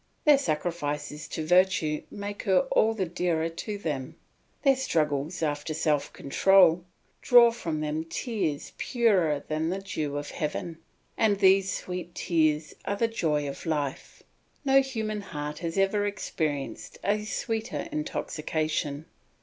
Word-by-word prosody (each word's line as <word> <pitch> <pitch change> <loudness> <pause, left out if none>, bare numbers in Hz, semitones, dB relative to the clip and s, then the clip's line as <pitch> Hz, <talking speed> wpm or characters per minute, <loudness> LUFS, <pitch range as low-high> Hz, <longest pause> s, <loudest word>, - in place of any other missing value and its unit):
Their 295 -2 +7
sacrifices 150 - -3
to 160 - -4
virtue 180 -3 +3
make 205 0 -6
her 190 -2 +3
all 225 +1 +3
the 195 -3 0
dearer 165 -1 0
to 205 +5 -5
them. 145 -9 -4 0.5
Their 275 -2 +5
struggles 155 - -1
after 150 +1 -2
self 150 -3 0
control 180 +3 +4 0.4
draw 240 -1 +7
from 165 -10 -3
them 155 +1 -2
tears 165 - -3
purer 190 - +2
than 155 +1 -1
the 185 - -1
dew 155 -7 -3
of 145 0 -5
heaven, 160 +2 -4 0.4
and 210 -3 +3
these 195 -1 +4
sweet 180 -1 -5
tears 155 -2 +1
are 200 - -1
the 230 - +2
joy 150 -10 0
of 140 - -7
life; 145 -4 -3 0.4
no 270 0 +6
human 220 -5 -3
heart 150 -5 -5
has 170 +1 -4
ever 205 +1 +2
experienced 155 -8 -3
a 210 +1 +1
sweeter 225 +4 -3
intoxication. 155 - -2
170 Hz, 135 wpm, -27 LUFS, 150-205 Hz, 0.5 s, Their